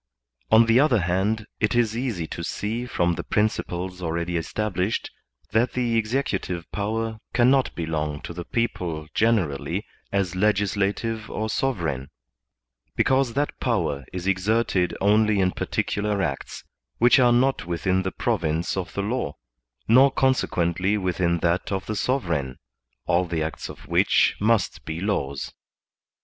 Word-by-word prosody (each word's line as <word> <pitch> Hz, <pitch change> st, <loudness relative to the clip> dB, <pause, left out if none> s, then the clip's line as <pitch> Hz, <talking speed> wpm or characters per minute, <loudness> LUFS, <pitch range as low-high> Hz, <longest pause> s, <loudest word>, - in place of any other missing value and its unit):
On 115 Hz, +1 st, +7 dB
the 115 Hz, +2 st, +4 dB
other 130 Hz, -7 st, +4 dB
hand, 95 Hz, +5 st, 0 dB
it 105 Hz, +2 st, +1 dB
is 115 Hz, -2 st, +2 dB
easy 115 Hz, -9 st, -2 dB
to 85 Hz, -, -6 dB
see 115 Hz, +7 st, -3 dB
from 85 Hz, -6 st, +1 dB
the -, -, -4 dB
principles 95 Hz, -3 st, -1 dB
already 85 Hz, +1 st, -2 dB
established, 95 Hz, +3 st, -2 dB, 0.4 s
that 115 Hz, +4 st, +2 dB
the 120 Hz, -2 st, 0 dB
executive 110 Hz, -7 st, -1 dB
power 110 Hz, +2 st, -2 dB, 0.2 s
cannot 130 Hz, +2 st, +3 dB
belong 75 Hz, -3 st, -2 dB
to -, -, -7 dB
the 85 Hz, 0 st, -6 dB
people 85 Hz, -9 st, -2 dB
generally 90 Hz, -4 st, +1 dB, 0.3 s
as 95 Hz, -3 st, 0 dB
legislative 105 Hz, +2 st, 0 dB
or 110 Hz, +1 st, -3 dB
sovereign, 85 Hz, -, -1 dB, 0.9 s
because 130 Hz, -2 st, +2 dB
that 145 Hz, +1 st, -1 dB
power 70 Hz, -1 st, 0 dB
is 90 Hz, -1 st, -5 dB
exerted 95 Hz, -1 st, +1 dB
only 105 Hz, +1 st, +3 dB
in 95 Hz, -1 st, +3 dB
particular 100 Hz, +2 st, -1 dB
acts, 70 Hz, -6 st, -4 dB, 0.3 s
which 120 Hz, +4 st, +5 dB
are 125 Hz, -1 st, +5 dB
not 125 Hz, -5 st, +2 dB
within 90 Hz, +2 st, 0 dB
the 95 Hz, 0 st, -2 dB
province 85 Hz, -7 st, -1 dB
of 95 Hz, -2 st, -3 dB
the 100 Hz, -, -1 dB
law, 120 Hz, +5 st, -2 dB, 0.5 s
nor 130 Hz, +4 st, +7 dB
consequently 100 Hz, -8 st, +1 dB
within 90 Hz, -3 st, 0 dB
that 85 Hz, +3 st, 0 dB
of 95 Hz, -1 st, -2 dB
the 110 Hz, -, -3 dB
sovereign, 85 Hz, -, -1 dB, 0.5 s
all 90 Hz, 0 st, +2 dB
the 85 Hz, -2 st, -2 dB
acts 80 Hz, -, -5 dB
of -, -, -11 dB
which -, -, +3 dB
must 110 Hz, -1 st, +1 dB
be 80 Hz, +1 st, -5 dB
laws. 70 Hz, -9 st, -2 dB
100 Hz, 140 wpm, -24 LUFS, 85-115 Hz, 0.9 s, On